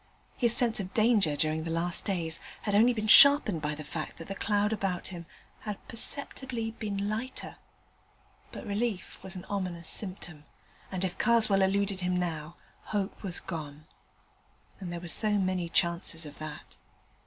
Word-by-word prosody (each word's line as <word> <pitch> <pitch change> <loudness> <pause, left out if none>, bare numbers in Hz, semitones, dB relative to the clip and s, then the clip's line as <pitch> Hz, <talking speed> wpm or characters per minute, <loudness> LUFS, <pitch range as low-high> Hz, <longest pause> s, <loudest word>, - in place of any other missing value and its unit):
His 235 -2 +4
sense 235 -5 +2
of 190 -1 -5
danger 215 -9 +4
during 155 +1 0
the 165 - -4
last 170 +2 +1
days 170 -5 -2 0.2
had 205 - -1
only 225 +4 +6
been 215 -3 -2
sharpened 280 - +7
by 150 0 -1
the 155 - -7
fact 155 +1 -5
that 165 - -9
the 195 - -3
cloud 205 +1 +1
about 195 -4 -2
him 170 -3 -8 0.3
had 210 -2 -7
perceptibly 240 -1 -2
been 205 -3 -3
lighter; 225 +5 -4 0.9
but - - -8
relief 210 -1 -2
was 190 0 -7
an 180 - -7
ominous 180 -4 -3
symptom, 175 -6 -2 0.5
and, 190 0 -1
if 185 0 -4
Karswell 220 -4 +5
eluded 195 0 +1
him 180 0 0
now, 165 -2 -3 0.3
hope 205 -1 -2
was 185 -4 -3
gone: 155 -3 -7 0.9
and 185 -3 -5
there 175 - -4
were 175 - -8
so 210 +5 +2
many 185 -3 0
chances 170 -1 0
of 145 -1 -10
that. 155 -1 -8
190 Hz, 165 wpm, -30 LUFS, 170-215 Hz, 0.9 s, sharpened